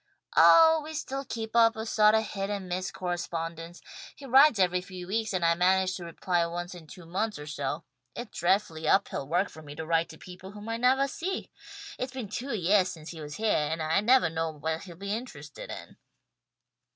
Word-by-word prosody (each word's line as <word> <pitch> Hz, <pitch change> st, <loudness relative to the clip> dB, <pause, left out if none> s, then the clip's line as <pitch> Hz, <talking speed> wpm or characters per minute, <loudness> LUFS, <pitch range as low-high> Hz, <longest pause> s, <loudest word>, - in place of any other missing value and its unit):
"Oh, 320 Hz, -1 st, +7 dB
we 315 Hz, +1 st, -7 dB
still 275 Hz, -2 st, -4 dB
keep 225 Hz, -3 st, -6 dB
up 230 Hz, -1 st, +5 dB
a 220 Hz, 0 st, -4 dB
sawt 215 Hz, -1 st, +4 dB
of 220 Hz, -1 st, +1 dB
hit 195 Hz, -1 st, -3 dB
and 200 Hz, -2 st, -4 dB
miss 185 Hz, +1 st, -2 dB
correspondence. 170 Hz, -2 st, -5 dB, 0.3 s
He 280 Hz, -, -12 dB
writes 270 Hz, 0 st, +6 dB
every 180 Hz, -1 st, +2 dB
few 180 Hz, -1 st, -9 dB
weeks 220 Hz, +3 st, -1 dB
and 180 Hz, -3 st, 0 dB
I 165 Hz, -, +5 dB
manage 185 Hz, +2 st, +2 dB
to 175 Hz, -, -8 dB
reply 170 Hz, +1 st, 0 dB
once 175 Hz, +2 st, -5 dB
in 170 Hz, -3 st, -12 dB
two 180 Hz, +1 st, -12 dB
months 205 Hz, +6 st, -2 dB
or 150 Hz, -, -8 dB
so. 145 Hz, -2 st, -4 dB, 0.3 s
It's 240 Hz, -1 st, -8 dB
dreadfully 165 Hz, -3 st, 0 dB
uphill 155 Hz, -6 st, +1 dB
work 175 Hz, +6 st, +1 dB
for 160 Hz, -, -13 dB
me 145 Hz, -1 st, -10 dB
to 160 Hz, -, -5 dB
write 165 Hz, 0 st, +1 dB
to 160 Hz, -, -11 dB
people 185 Hz, +3 st, -11 dB
whom 210 Hz, +1 st, -9 dB
I 230 Hz, -, -1 dB
nevah 260 Hz, +3 st, +3 dB
see. 355 Hz, +8 st, -4 dB, 0.5 s
It's 255 Hz, +1 st, -4 dB
been 250 Hz, -6 st, -5 dB
two 255 Hz, +6 st, -4 dB
yeahs 190 Hz, +1 st, +3 dB
since 160 Hz, -1 st, -10 dB
he 165 Hz, -2 st, -9 dB
was 150 Hz, 0 st, -7 dB
heah, 220 Hz, -1 st, +1 dB
and 160 Hz, +1 st, -2 dB
I 160 Hz, +4 st, +1 dB
nevah 245 Hz, -4 st, +4 dB
know 165 Hz, 0 st, -1 dB
what 160 Hz, +1 st, -3 dB
he'll 175 Hz, -3 st, -10 dB
be 200 Hz, +3 st, -4 dB
interested 255 Hz, -, -8 dB
in." -, -, -9 dB
185 Hz, 210 wpm, -28 LUFS, 165-225 Hz, 0.5 s, Oh